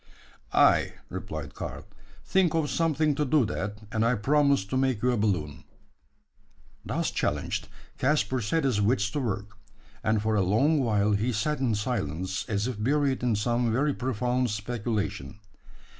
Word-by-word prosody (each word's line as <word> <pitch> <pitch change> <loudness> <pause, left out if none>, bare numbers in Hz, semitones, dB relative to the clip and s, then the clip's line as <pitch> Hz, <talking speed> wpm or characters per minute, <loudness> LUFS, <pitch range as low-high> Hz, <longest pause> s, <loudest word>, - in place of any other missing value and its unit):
"Ay," - - +4 0.2
replied - - -6
Karl; - - -6 0.4
"think 185 -4 +2
of 155 -3 0
something 155 -2 +2
to 150 - 0
do 145 -2 +3
that, 105 -1 -3
and 110 0 +1
I 120 +2 +3
promise 140 +1 +2
to 100 - -4
make 130 -4 +1
you 125 - +3
a - - +1
balloon." 80 -9 -1 1.2
Thus - - -1
challenged, - - -2 0.3
Caspar 130 -2 +1
set 160 +10 0
his 125 -7 +1
wits 105 -1 +2
to 150 - -2
work; 105 -4 -4 0.4
and 110 0 +2
for 110 +1 0
a 105 - +3
long 115 - +3
while 105 -5 +2
he 105 +5 +1
sat 145 +7 -1
in 125 -5 +1
silence, 95 - -3
as 105 -1 0
if 110 -4 -4
buried 140 +1 +1
in 120 -3 +1
some 120 +2 +1
very 140 +5 +1
profound 125 0 -1
speculation. 105 - -3
115 Hz, 160 wpm, -27 LUFS, 105-135 Hz, 1.2 s, Ay